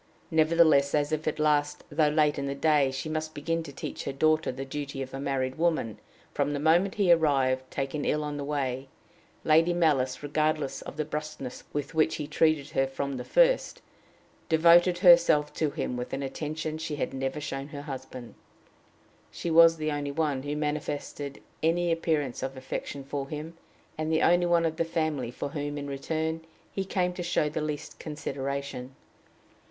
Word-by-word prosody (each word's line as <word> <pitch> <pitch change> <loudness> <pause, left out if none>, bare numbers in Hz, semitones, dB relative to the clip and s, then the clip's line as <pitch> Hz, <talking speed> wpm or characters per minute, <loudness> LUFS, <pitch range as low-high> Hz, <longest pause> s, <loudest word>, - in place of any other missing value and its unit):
Nevertheless, 155 -3 +4
as 145 0 +1
if 155 0 -2
at 155 - 0
last, 150 -1 +1
though 150 +1 +3
late 150 -1 +2
in 140 - -2
the 140 - -2
day, 145 -1 +3
she 135 +4 -4
must 155 0 -3
begin 165 +3 -1
to 155 -3 -8
teach 140 - -6
her - - -2
daughter 155 +3 +2
the 135 +2 -6
duty 140 0 -4
of 130 - -10
a 135 - -4
married 135 -1 -2
woman, 160 - 0 0.3
from 145 - 0
the 145 - -2
moment 170 +6 +3
he 195 -4 +3
arrived, 135 -5 +2
taken 140 +2 -3
ill 150 0 0
on 150 0 -4
the 145 - -4
way, 135 -2 -2 0.6
Lady 165 +3 +4
Malice, 145 -7 +1
regardless 155 -1 0
of - - -9
the 155 - -1
brusqueness 150 -4 -6
with 145 +1 -4
which 160 0 +2
he 150 - -4
treated 155 -1 +1
her 135 -2 +1
from 135 0 -3
the 125 - -5
first, - - +3 0.7
devoted 170 +2 +6
herself 170 -5 +6
to 155 - 0
him 125 - -3
with 125 0 -5
an 140 - -2
attention 155 +3 -4
she 160 -1 -3
had - - -3
never 135 +2 -2
shown 135 -1 -4
her 145 -1 -8
husband. 130 -4 -8 1.0
She 170 - -4
was 165 0 +7
the 155 -1 -1
only 145 -1 -2
one 145 -3 0
who 145 +2 -3
manifested 150 -1 -4 0.2
any 170 +2 +2
appearance 155 -6 0
of 130 0 -4
affection 135 +1 -5
for 140 0 -4
him, 155 +2 -6 0.4
and 155 0 -1
the 160 - +2
only 175 0 +4
one 170 -1 +3
of 160 -1 -1
the 165 - +2
family 155 -6 -1
for 125 - -5
whom, 145 0 -4
in 145 - -4
return, 160 +3 -2 0.3
he 195 - -3
came 180 -2 0
to 180 - -5
show 170 -3 +1
the 155 +1 -3
least 150 -1 -5
consideration. 140 -3 -5
150 Hz, 185 wpm, -28 LUFS, 140-160 Hz, 1.0 s, was